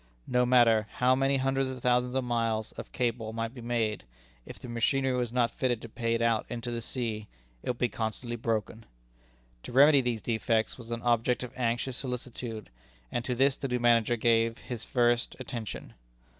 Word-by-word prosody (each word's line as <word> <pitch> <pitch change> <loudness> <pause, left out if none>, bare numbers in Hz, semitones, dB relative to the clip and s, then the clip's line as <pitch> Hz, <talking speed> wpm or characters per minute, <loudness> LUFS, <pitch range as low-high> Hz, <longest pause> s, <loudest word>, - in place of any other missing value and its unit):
No 125 0 +2
matter 115 -4 +5
how 125 +1 +3
many 135 +1 +2
hundreds 135 0 +1
or 130 -1 -6
thousands 125 +1 +1
of 130 - +1
miles 115 -2 -1
of - - -9
cable 115 -3 -1
might 115 +1 -3
be 125 - -9
made, 115 -3 -1 0.4
if - - -9
the - - -10
machinery 130 +3 +1
was 120 -2 -1
not 120 -1 +2
fitted 125 -3 0
to - - -6
pay 115 +1 -1
it 115 - 0
out 115 -2 +1
into 120 0 -4
the 120 0 -3
sea, 110 -3 -3 0.3
it - - -5
would 125 - -1
be 125 - +2
constantly 115 +2 -4
broken. 110 -1 -3 0.7
To - - -9
remedy 140 +2 +7
these 120 -3 -2
defects 110 -1 0
was 120 -2 -11
an 115 0 -3
object 120 +1 +2
of 125 0 -7
anxious 120 +1 -1
solicitude, 120 - -5 0.4
and 120 - -1
to 125 - -1
this 135 +2 +3
the 135 - -4
new 125 -1 -1
manager 120 -1 +4
gave 115 0 +2
his 120 -3 -7
first 120 0 +1
attention. 120 -4 -6
120 Hz, 190 wpm, -29 LUFS, 115-125 Hz, 0.7 s, remedy